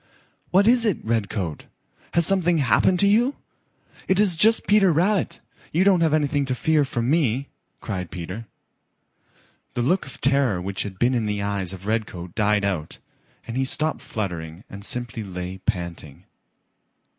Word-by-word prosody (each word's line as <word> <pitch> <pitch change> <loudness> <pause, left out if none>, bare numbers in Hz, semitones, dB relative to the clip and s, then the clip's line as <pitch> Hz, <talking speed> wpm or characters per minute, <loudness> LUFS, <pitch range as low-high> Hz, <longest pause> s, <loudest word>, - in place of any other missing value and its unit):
"What 195 +3 +4
is 240 +1 +4
it, 210 -6 +1
Redcoat? 100 -7 -2 0.5
Has 170 -1 +4
something 175 -2 +3
happened 145 - +3
to 200 - +4
you? 235 +7 +3 0.7
It 190 +1 +2
is 200 -5 +3
just 220 +7 +4
Peter 200 -3 +4
Rabbit. 185 +5 +1 0.3
You 170 +4 +2
don't 190 -3 +4
have 165 -2 +3
anything 145 -1 +1
to 130 -1 -2
fear 155 +2 +2
from 120 -2 -2
me," 140 -3 +1 0.3
cried 90 -5 -4
Peter. 95 +6 -7 1.3
The 120 - 0
look 180 +8 +1
of 135 - -10
terror 135 -8 +2
which 95 +2 -3
had 95 -2 -5
been 120 +5 +2
in 115 -3 0
the 105 -1 -2
eyes 100 -3 -1
of 95 0 -9
Redcoat 100 -6 -3
died 105 -1 +1
out, 90 -6 -3 0.5
and 115 - -6
he 135 - +1
stopped 155 +3 +1
fluttering 85 -4 -5
and 100 0 -9
simply 120 +1 -2
lay 90 -1 -6
panting. 85 -8 -4
120 Hz, 160 wpm, -23 LUFS, -, 1.3 s, What